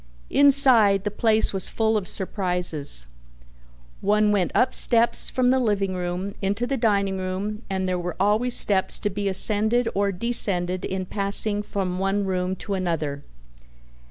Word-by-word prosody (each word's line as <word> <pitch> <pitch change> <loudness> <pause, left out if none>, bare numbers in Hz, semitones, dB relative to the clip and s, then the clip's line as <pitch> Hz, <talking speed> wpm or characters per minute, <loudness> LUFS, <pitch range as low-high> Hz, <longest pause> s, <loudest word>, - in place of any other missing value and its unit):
Inside, 260 -9 +4
the 210 - -3
place 220 0 +1
was 190 -2 0
full 220 0 -1
of 205 -4 -2
surprises. 180 - +1 1.0
One 210 +1 +1
went 195 -4 0
up 255 - +1
steps 235 -1 +2
from 250 -1 0
the 260 - +1
living 200 -5 -1
room 180 +2 -5
into 200 +4 -2
the 275 - -3
dining 200 -5 -1
room 195 +3 -5
and 190 -1 -3
there 180 -1 -2
were 175 -1 -5
always 215 +5 +1
steps 195 -2 +2
to 205 - -4
be 200 +1 -3
ascended 220 +5 +2
or 200 0 -1
descended 185 -4 0
in 185 0 -4
passing 200 +2 +2
from 190 -3 -4
one 195 +1 -1
room 185 0 -3
to 200 +2 -6
another. 160 -6 -3
200 Hz, 155 wpm, -22 LUFS, 185-215 Hz, 1.0 s, Inside